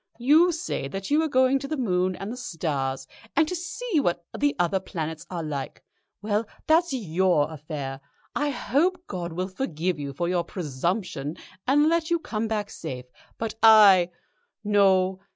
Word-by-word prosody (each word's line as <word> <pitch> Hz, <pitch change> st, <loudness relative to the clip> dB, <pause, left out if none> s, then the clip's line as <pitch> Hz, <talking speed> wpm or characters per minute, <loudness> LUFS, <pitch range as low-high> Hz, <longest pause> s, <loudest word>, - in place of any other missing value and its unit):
You 305 Hz, +9 st, +5 dB
say 315 Hz, -, -3 dB
that 195 Hz, -, -6 dB
you 300 Hz, +2 st, +4 dB
are 320 Hz, -, +1 dB
going 260 Hz, -1 st, +3 dB
to 275 Hz, -, -6 dB
the 310 Hz, +1 st, -3 dB
moon 185 Hz, -6 st, +1 dB
and 195 Hz, +4 st, -6 dB
the -, -, -5 dB
stars, 145 Hz, -, -3 dB, 0.3 s
and 320 Hz, -, +4 dB
to 360 Hz, -, -3 dB
see 360 Hz, +2 st, -2 dB
what 175 Hz, -9 st, -1 dB
the 290 Hz, 0 st, +1 dB
other 175 Hz, +1 st, +1 dB
planets 160 Hz, -4 st, -5 dB
are 175 Hz, -3 st, -4 dB
like. 145 Hz, -3 st, -5 dB, 0.4 s
Well, 210 Hz, +1 st, 0 dB, 0.2 s
that's 330 Hz, +1 st, +3 dB
your 180 Hz, -, +1 dB
affair. 145 Hz, -3 st, -6 dB, 0.3 s
I 295 Hz, 0 st, +1 dB
hope 345 Hz, +7 st, 0 dB
God 175 Hz, -, -5 dB
will 180 Hz, +3 st, -2 dB
forgive 180 Hz, -, -2 dB
you 140 Hz, -1 st, -4 dB
for 170 Hz, +6 st, -2 dB
your 175 Hz, -1 st, +1 dB
presumption, 165 Hz, -1 st, -3 dB, 0.3 s
and 295 Hz, +3 st, +4 dB
let 330 Hz, 0 st, +1 dB
you 340 Hz, -, +3 dB
come 225 Hz, -9 st, -3 dB
back 210 Hz, -2 st, -2 dB
safe, 125 Hz, -5 st, -6 dB, 0.3 s
but 225 Hz, -1 st, -3 dB
I 205 Hz, -5 st, +8 dB, 0.5 s
No. 190 Hz, -2 st, +3 dB
190 Hz, 170 wpm, -25 LUFS, 165-270 Hz, 0.5 s, I